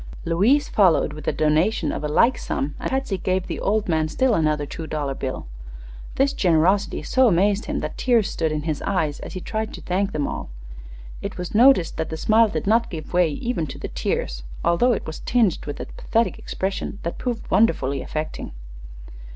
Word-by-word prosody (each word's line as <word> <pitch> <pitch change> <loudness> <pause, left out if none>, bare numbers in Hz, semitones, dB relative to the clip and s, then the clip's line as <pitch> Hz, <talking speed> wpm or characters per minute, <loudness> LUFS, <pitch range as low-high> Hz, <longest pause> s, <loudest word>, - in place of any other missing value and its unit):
Louise 210 - +3
followed 185 -6 +3
with 155 -1 -9
a - - +3
donation 155 +2 +1
of - - -4
a - - 0
like 235 +12 +4
sum, 140 -8 -3
and - - -3
Patsy 265 -8 -1
gave 185 0 0
the - - -5
old 210 +1 0
man 160 -2 +1
still 260 +9 +1
another 155 -5 +1
two 160 +3 -7
dollar 145 -3 -2
bill. 130 -1 -4 0.7
This 275 +1 +2
generosity 185 +3 +2
so 260 -1 +3
amazed 200 +2 +2
him 295 -1 -2
that - - -5
tears 235 -5 +3
stood 160 -2 -1
in 150 -1 -2
his 155 -2 -2
eyes 155 -7 -1
as - - -8
he 185 - -5
tried 220 +2 -3
to - - -10
thank 195 +2 -1
them 150 -5 -1
all. - - -5 0.7
It - - -5
was 180 -1 -5
noticed 230 -6 +5
that 160 - -2
the 160 - -4
smile 220 +6 +4
did - - -3
not 230 +3 +3
give 160 -1 -7
way 175 -2 +4
even 195 - -2
to - - -8
the - - -6
tears, - - -2 0.2
although 170 +9 +3
it - - -3
was 160 - -6
tinged 225 -11 +1
with 145 - -5
a - - -4
pathetic 230 +1 -1
expression 195 +1 -3
that 170 - -4
proved 245 -3 -4
wonderfully 140 - +2
affecting. 155 0 -5
180 Hz, 200 wpm, -23 LUFS, 155-220 Hz, 0.7 s, noticed